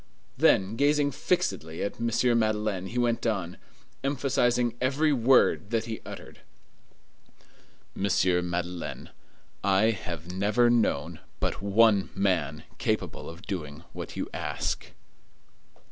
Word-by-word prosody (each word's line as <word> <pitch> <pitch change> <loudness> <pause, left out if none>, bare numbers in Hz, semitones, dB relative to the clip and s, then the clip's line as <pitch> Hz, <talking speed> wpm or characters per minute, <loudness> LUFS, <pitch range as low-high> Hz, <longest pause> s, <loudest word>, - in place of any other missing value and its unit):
Then, 95 +4 +3
gazing 145 +1 +3
fixedly 130 - -1
at 100 - -3
M. 115 - +1 0.3
Madeleine, 105 -4 0
he 115 +6 -6
went 120 -1 +1
on, 95 -6 -2 0.4
emphasizing 125 -3 +1
every 145 +4 +2
word 125 -4 +4
that 115 -1 0
he 115 -1 -5
uttered:— - - -10 1.5
"Monsieur 90 -2 +2
Madeleine, 90 0 -4 0.5
I 100 +3 +4
have 90 -4 -6
never 105 +6 +3
known 85 -8 +1 0.2
but - - -2
one 100 0 +4
man 85 -6 0 0.2
capable - - -2
of 85 +2 -11
doing 80 -6 -5
what - - -7
you - - -3
ask." - - -3
105 Hz, 115 wpm, -27 LUFS, 90-120 Hz, 1.5 s, word